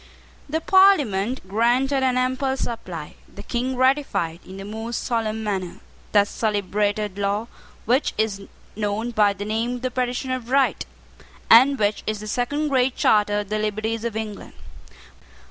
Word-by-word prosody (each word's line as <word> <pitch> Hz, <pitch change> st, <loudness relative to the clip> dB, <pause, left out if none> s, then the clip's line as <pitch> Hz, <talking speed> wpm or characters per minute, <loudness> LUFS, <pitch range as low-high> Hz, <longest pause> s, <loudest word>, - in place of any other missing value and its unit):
The 320 Hz, +2 st, -1 dB
Parliament 265 Hz, -, +3 dB
granted 245 Hz, +7 st, +2 dB
an 255 Hz, -1 st, +2 dB
ample 260 Hz, +1 st, 0 dB
supply. 235 Hz, -3 st, -5 dB, 0.2 s
The -, -, -10 dB
King 255 Hz, +2 st, -2 dB
ratified, 260 Hz, -, +1 dB
in 190 Hz, -, -11 dB
the 195 Hz, -, -7 dB
most 225 Hz, +3 st, -4 dB
solemn 220 Hz, -2 st, -1 dB
manner, 190 Hz, -4 st, -3 dB, 0.3 s
that 205 Hz, -1 st, +4 dB
celebrated 205 Hz, -1 st, -1 dB
law, 200 Hz, +2 st, 0 dB, 0.4 s
which 250 Hz, +6 st, +1 dB
is 215 Hz, -2 st, -1 dB, 0.3 s
known 215 Hz, +3 st, -2 dB
by 210 Hz, -3 st, +3 dB
the 200 Hz, +1 st, -6 dB
name 225 Hz, +3 st, -1 dB
of 245 Hz, -, -7 dB
the 255 Hz, -, -1 dB
Petition 250 Hz, +1 st, -2 dB
of 250 Hz, -2 st, -4 dB
Right, 275 Hz, 0 st, +2 dB, 0.6 s
and 265 Hz, +5 st, +7 dB
which 205 Hz, -2 st, 0 dB
is 215 Hz, -1 st, -1 dB
the 215 Hz, -, -8 dB
second 285 Hz, +7 st, -1 dB
Great 260 Hz, -1 st, +2 dB
Charter 210 Hz, -1 st, +3 dB
of 205 Hz, -, -10 dB
the 215 Hz, 0 st, -1 dB
liberties 215 Hz, +1 st, -2 dB
of 235 Hz, -2 st, -3 dB
England. 215 Hz, -2 st, -6 dB
225 Hz, 155 wpm, -23 LUFS, 205-255 Hz, 0.6 s, and